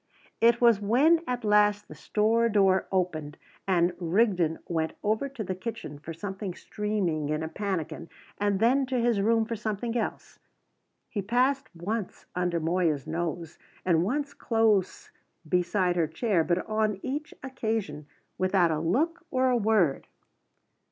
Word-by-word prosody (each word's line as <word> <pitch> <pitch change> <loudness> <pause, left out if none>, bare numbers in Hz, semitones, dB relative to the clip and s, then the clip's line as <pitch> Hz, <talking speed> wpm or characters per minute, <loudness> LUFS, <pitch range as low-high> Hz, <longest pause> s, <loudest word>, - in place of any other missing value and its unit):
It 235 +1 +4
was 235 -4 +5
when 280 +11 +4
at 250 -1 -2
last 210 -1 +3
the - - -10
store 225 +2 +1
door 195 -3 +3
opened, 160 -6 -1 0.3
and 175 -2 +2
Rigden 180 -2 +2
went 160 -2 -1
over 220 +7 0
to 260 -5 -6
the 185 - -3
kitchen 185 -7 -6
for 160 - -8
something 190 +2 -5
steaming 195 -10 -2
in 155 +1 -1
a - - -2
pannikin, 185 -3 -4 0.3
and 205 -1 +1
then 260 +4 +3
to 255 -1 0
his 235 -4 +2
room 225 +2 +3
for 230 +1 -3
something 220 +2 -3
else. 230 - -4 0.7
He 205 - -3
passed 255 +6 +1
once 200 +4 -4
under 175 -1 0
Moya's 165 -4 0
nose, 165 0 -4 0.3
and 170 -2 +3
once 280 +8 -2
close 220 -5 +1 0.4
beside 180 +2 +1
her 165 -2 +2
chair, 170 +2 +1
but 175 +2 0
on 215 -2 0
each 290 +3 -4
occasion 220 - -3 0.3
without 185 -2 +3
a 155 - 0
look 315 - 0
or 255 -1 +2
a - - +3
word. 210 - +2
205 Hz, 150 wpm, -27 LUFS, 175-230 Hz, 0.7 s, was